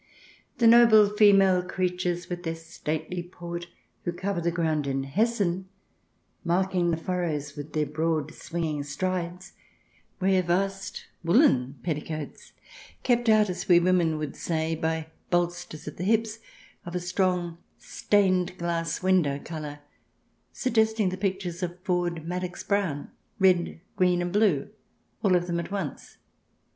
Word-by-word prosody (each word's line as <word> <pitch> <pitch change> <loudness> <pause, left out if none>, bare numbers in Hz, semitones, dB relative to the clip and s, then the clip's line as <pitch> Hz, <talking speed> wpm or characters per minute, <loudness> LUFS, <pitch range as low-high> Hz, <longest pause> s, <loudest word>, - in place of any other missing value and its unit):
The 235 - +2
noble 225 -3 +7
female 195 -3 +6
creatures, 180 -1 -2
with 175 0 -5
their 165 -2 -3
stately 165 +1 -4
portj 175 0 -7 0.4
who 175 - -1
cover 185 +1 -2
the 170 - +1
ground 160 -4 0
in 135 0 -1
Hessen, 190 +2 0 0.7
marking 180 0 +1
the 165 - +1
furrows 160 -5 -2
with 145 +1 -8
their 155 -1 +1
broad 155 0 -1
swinging 160 -3 -3
strides, 180 +4 -3 0.7
wear 190 0 +3
vast 195 +2 -2 0.2
woollen 165 - +4
petticoats, 155 -2 -5 0.2
" - - -20
kept 240 -2 +2
out," 215 -1 +5
as 180 +1 -5
we 175 -1 +8
women 175 -3 +2
would 150 -2 -4
say, 160 -1 -1
by 160 0 -1 0.2
bolsters 175 -3 -1
at 150 - -7
the 175 - -4
hips, 225 +2 +1 0.4
of 175 +1 -7
a - - +1
strong 180 -2 -1 0.2
stained 185 -3 +1
glass 165 -1 -2
window 180 -7 +3
colour, 150 -1 -7 0.7
suggesting 220 -5 +1
the 185 - -3
pictures 190 -2 -3
of 175 0 -4
Ford 175 -3 -1
Madox 180 +1 -4
Brown 190 -9 -1
— - - -43
red, 180 -3 +3 0.2
green, 180 -1 +2
and 175 +1 -3
blue, 200 -9 +2 0.5
all 190 -3 +4
of 175 0 +1
them 170 -1 -1
at 170 - -5
once. 195 -8 -5
175 Hz, 140 wpm, -27 LUFS, 165-190 Hz, 0.7 s, we